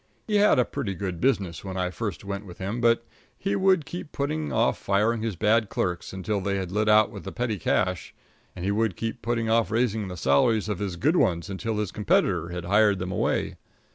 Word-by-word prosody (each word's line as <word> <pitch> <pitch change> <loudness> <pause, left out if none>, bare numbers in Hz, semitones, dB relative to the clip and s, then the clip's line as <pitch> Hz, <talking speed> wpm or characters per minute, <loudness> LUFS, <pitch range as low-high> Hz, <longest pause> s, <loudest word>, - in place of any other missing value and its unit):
He 210 -2 +1
had 205 -5 +5
a 125 - +4
pretty 115 -9 -4
good 90 -2 -4
business 100 - 0
when 95 -1 -5
I 90 -1 -1
first 100 0 -5
went 100 0 -4
with 90 - -11
him, 100 +5 -3
but 115 0 +3 0.3
he 200 +1 -1
would 190 -5 +3
keep 175 -1 -7
putting 150 +2 -2
off 115 +2 +1
firing 110 +3 +1
his 110 -3 -2
bad 110 +3 +2
clerks 90 -1 -2
until 95 +2 -2
they 100 +1 -1
had 95 -2 -3
lit 105 +2 +1
out 105 0 +5
with - - -9
the - - -6
petty 115 -5 -2
cash; 90 +1 0 0.4
and 90 - -5
he 100 - +1
would 110 -2 0
keep 115 +3 -4
putting 115 -1 -1
off 115 -1 +2
raising 110 -2 0
the 90 -1 -7
salaries 100 - +2
of 105 -3 -2
his 100 -4 -3
good 150 - +2
ones 85 - +1
until 110 +3 -3
his 105 -4 -2
competitor 90 -5 +1
had 90 0 -5
hired 105 +2 +4
them 90 +1 -4
away. - - -1
105 Hz, 220 wpm, -26 LUFS, 95-115 Hz, 0.4 s, had